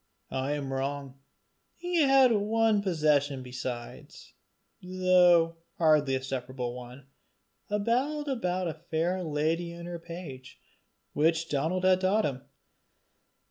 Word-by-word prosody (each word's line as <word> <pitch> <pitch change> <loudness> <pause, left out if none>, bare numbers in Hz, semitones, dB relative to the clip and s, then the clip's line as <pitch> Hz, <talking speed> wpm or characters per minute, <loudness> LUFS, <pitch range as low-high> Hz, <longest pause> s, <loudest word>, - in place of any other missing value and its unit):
I 135 +2 -1
am 140 -2 -4
wrong 135 0 -4 0.6
he 350 -1 0
had 270 -3 +5
one 220 0 +2
possession 150 -7 +1
besides, 125 -1 -7 0.5
though 180 -2 +4 0.2
hardly 150 -4 +3
a 130 - -3
separable 130 -2 -4
one 125 +2 -10 0.6
a 210 - +1
ballad 270 +8 0
about 185 -9 -1
a 165 - -2
fair 170 +3 -2
lady 160 +2 -1
and 170 0 -9
her 175 -1 -6
page, 165 -7 -9 0.5
which 165 +2 +1
Donal 160 +6 -1
had 185 0 +4
taught 205 +3 +2
him. 135 -2 -3
165 Hz, 120 wpm, -28 LUFS, 135-185 Hz, 0.6 s, had